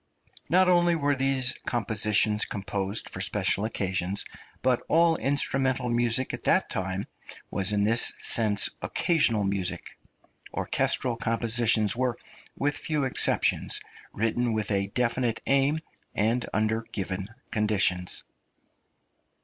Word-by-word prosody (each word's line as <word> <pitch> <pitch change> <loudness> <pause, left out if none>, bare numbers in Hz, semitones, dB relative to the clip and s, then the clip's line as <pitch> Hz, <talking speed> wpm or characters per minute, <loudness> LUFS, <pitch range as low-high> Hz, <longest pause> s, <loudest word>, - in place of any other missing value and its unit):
Not 185 +4 +4
only 175 -1 +3
were 145 -2 0
these 135 -1 +2
compositions 105 -2 +3
composed 100 +1 -3
for - - -6
special 100 - +1
occasions, 95 -2 -1 0.4
but 125 -1 +1
all 165 +1 +3
instrumental 135 -2 0
music 120 +2 +1
at - - -5
that - - +2
time 95 +1 -3 0.5
was 100 +1 +1
in 105 -1 +1
this 115 +3 +6
sense 105 -3 +3
occasional 135 -11 +1
music. 95 -3 -2 0.6
Orchestral 120 -3 0
compositions 115 -2 +1
were, 125 -1 -1 0.4
with 145 +1 -1
few 150 -2 -2
exceptions, 130 - +1 0.3
written 115 +2 -1
with 110 -1 -3
a 100 -1 0
definite 120 +1 -1
aim 140 +3 +1 0.3
and 115 +4 0
under 110 +1 0
given 95 -1 -4 0.2
conditions. 100 -5 0
115 Hz, 115 wpm, -26 LUFS, 100-130 Hz, 0.6 s, this